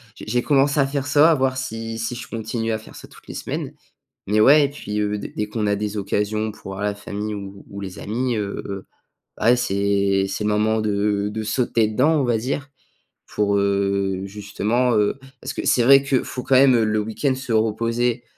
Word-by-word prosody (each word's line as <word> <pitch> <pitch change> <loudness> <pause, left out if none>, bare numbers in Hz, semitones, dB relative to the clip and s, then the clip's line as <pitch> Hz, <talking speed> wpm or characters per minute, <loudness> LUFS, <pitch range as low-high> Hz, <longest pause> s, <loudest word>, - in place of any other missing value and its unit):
J'ai - - -10
j'ai 120 +2 0
commencé 140 0 +3
à 135 - +5
faire 140 0 -3
ça, 150 +3 +5
à - - +5
voir 130 -3 0
si 115 -3 -4
si 115 +2 -3
je 120 -1 -7
continue 115 0 -3
à 110 - 0
faire 110 - -14
ça, - - -11
toutes - - -19
les - - -7
semaines, - - -4 0.5
mais 105 +2 +1
ouais 145 +5 +7
et - - -2
puis, 105 -7 -5
heu, 105 0 -1
dès - - -5
dès 105 - -1
qu'on 105 -1 -2
a 100 - +2
des 105 +1 -3
occasions 105 +2 -1
pour 95 - -10
voir 95 +1 -6
la 105 0 -1
famille 105 +1 -5
ou 100 -1 -8
ou 100 - -8
les 95 -1 -7
amis, 120 +3 -2
heu, 100 -1 -5 0.5
ouais, 120 +2 +5
c'est 100 -3 +1
c'est 100 +2 -3
le - - +2
moment 110 +1 +1
de 105 -1 0
de 110 +1 -4
sauter 115 0 +1
dedans, 140 +9 +2
on - - +1
va 120 -2 +2
dire 140 +4 -3 0.6
pour, 100 -1 +1
heu, 100 -1 0
justement, 105 +5 -1
heu 105 +4 +2 0.2
parce - - -5
que - - -4
c'est 125 - +3
vrai 135 +2 +7
que 135 -2 +1
faut 125 - -6
quand 135 - 0
même, 130 -1 +6
heu, 115 - +3
le 110 0 +1
week-end 110 +6 -1
se 130 -2 -6
reposer, 115 +2 0
110 Hz, 220 wpm, -22 LUFS, 105-125 Hz, 0.6 s, ouais